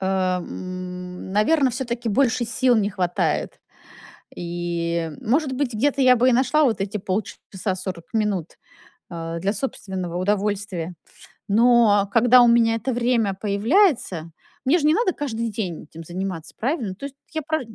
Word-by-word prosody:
эм, 185 -1 -3
наверно, 260 +7 +3
всё-таки 240 -1 -3
больше 240 +2 +2
сил 245 +1 +2
не 210 -1 +1
хватает. 180 -2 -1 0.8
И 170 -1 -2
может 270 +4 +1
быть, 260 -3 -2
где-то 280 +5 +1
я 255 -1 +6
бы 250 +2 +3
и - - +3
нашла 260 +5 +3
вот 220 -6 +1
эти 205 +2 -2
полчаса, 190 0 -3
40 185 -2 -6
минут, 205 -6 -1 0.5
э, 165 0 -5
для 200 +2 0
собственного 190 -7 -4
удовольствия. 195 -2 -1 0.5
Но, 215 -2 +4
когда 245 +2 +6
у 240 - +6
меня 230 -1 +4
это 235 +3 -2
время 235 -4 +1
появляется, 210 - +1 0.3
мне 305 +7 +4
же 295 - -1
не 305 - +5
надо 420 -2 +2
каждый 230 -5 -3
день 190 -6 -4
этим 165 +2 -11
заниматься, 175 -1 -5
правильно? 240 - -2
То 275 +8 -6
есть 275 - -15 0.2
я 315 - -2
про 315 0 -1
210 Hz, 150 wpm, -23 LUFS, 185-250 Hz, 0.8 s, я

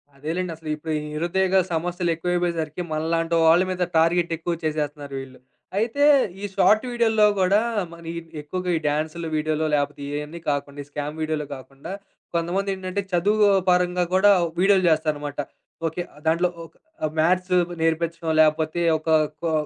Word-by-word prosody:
అదేలెండసలు 160 +2 -4
ఇప్పుడు 155 +1 -6
ఈ - - -1
నిరుద్యోగ 185 +4 +1 0.2
సమస్యలెక్కువైపోయేసరికి, 175 -1 -1
మనలాంటి 165 +2 0
వాళ్ళ 170 +3 +6
మీద 180 -1 -1
టార్గెట్ 170 +1 +3
ఎక్కువ 170 +2 -2
చేసేస్తున్నారు 150 -2 -3
వీళ్ళు. 130 -1 -10 0.4
అయితే 235 +6 0 0.4
ఈ - - -3
షార్ట్ 215 +4 +4
వీడియో‌ల్లో 225 -3 +3
గూడా 190 +3 +4 0.3
మరి 170 -1 -9
ఇ - - -10 0.2
ఎక్కువగా 180 +5 -4
ఈ - - -2
డాన్స్‌లు 155 +3 -2
వీడియో‌లు 155 0 0
లేపోతే 145 0 -2
ఇయన్నీ 150 +3 -5
కాకుండా 145 0 -3
ఈ 140 - -21
స్కామ్ 150 +2 -5
వీడియో‌లో 155 -1 -1
కాకుండా 135 +4 -10 0.4
కొంతమందేంటంటే, 190 +2 -1
చదువు 205 +4 +3 0.2
పరంగా 180 0 +2
గూడా 195 +2 +6 0.3
వీడియో‌లు 195 0 +4
చేస్తారన్నమాట. 150 -2 -1 0.5
ఓకే. 165 +3 -3
ఆహ్, - - -16
దాంట్లో 170 +3 +2 0.2
ఒక - - -18 0.3
ఆహ్, 155 - 0
మ్యాథ్స్ 180 +3 +2 0.3
నేర్పించడం 165 0 0
లేపోతే 155 +2 +2 0.2
ఒక 155 +1 -6 0.3
కొ 165 - 0
165 Hz, 140 wpm, -23 LUFS, 155-180 Hz, 0.5 s, వాళ్ళ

